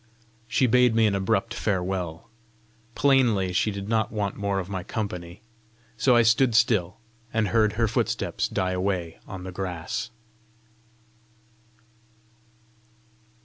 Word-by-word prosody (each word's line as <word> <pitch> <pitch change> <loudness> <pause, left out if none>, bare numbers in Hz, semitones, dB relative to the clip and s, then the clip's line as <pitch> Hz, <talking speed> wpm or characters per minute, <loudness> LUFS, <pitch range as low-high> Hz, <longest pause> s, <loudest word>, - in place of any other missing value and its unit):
She 130 - +2
bade 125 -1 +4
me 115 -1 +4
an 105 - +2
abrupt 100 +3 0
farewell. 90 -6 -2 0.7
Plainly 115 -8 +3
she 100 - +2
did 100 -1 -5
not 110 -1 0
want 105 -2 -2
more 100 -1 -2
of 95 -2 -3
my 95 -2 -4
company; 90 -2 -5 0.5
so 120 +3 +3
I 120 - +6
stood 115 +1 +3
still, 110 -4 +2 0.3
and 110 -3 0
heard 110 +1 +2
her 115 +1 +1
footsteps - - -1
die 95 0 -1
away 90 -3 -2
on 95 -2 -7
the 95 - -6
grass. 90 +4 -4
100 Hz, 125 wpm, -25 LUFS, 95-115 Hz, 0.7 s, I